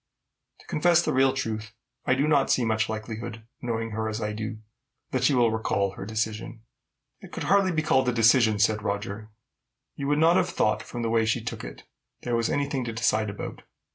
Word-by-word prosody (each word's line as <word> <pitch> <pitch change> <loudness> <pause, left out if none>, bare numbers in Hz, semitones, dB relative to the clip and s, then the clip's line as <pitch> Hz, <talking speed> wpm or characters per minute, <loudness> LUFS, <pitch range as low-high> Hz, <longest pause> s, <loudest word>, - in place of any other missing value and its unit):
To - - -20
confess 170 +2 +3
the - - 0
real 130 0 +4
truth, 110 -5 -4 0.3
I 130 - +4
do 140 +3 +1
not 145 -3 +3
see 125 - +2
much 110 0 0
likelihood, 110 +1 -5 0.2
knowing 115 -2 -2
her 110 +1 -2
as 110 0 -3
I 105 -1 -2
do, 110 +1 -5 0.5
that 130 -1 -1
she 135 +2 +4
will 120 -2 +4
recall 100 -3 0
her 95 +1 -8
decision." 110 +1 -3 0.6
"It - - -13
could - - -5
hardly 195 0 +3
be 155 -2 0
called 130 -5 +3
a - - +2
decision," 115 -2 +4
said 105 +1 +2
Roger. 105 +1 -4 0.7
"You 140 - -4
would 145 +1 +2
not 165 +3 +5
have 180 -1 +2
thought, 105 -10 +1
from 120 -1 -6
the 115 - -1
way 115 -1 +2
she 110 - 0
took - - -5
it, - - -9 0.4
there 120 -1 -1
was 115 -1 +1
any 145 0 0
thing 135 -2 -2
to 115 - -4
decide 110 -2 +1
about. 100 - -7
115 Hz, 210 wpm, -26 LUFS, 110-130 Hz, 0.7 s, not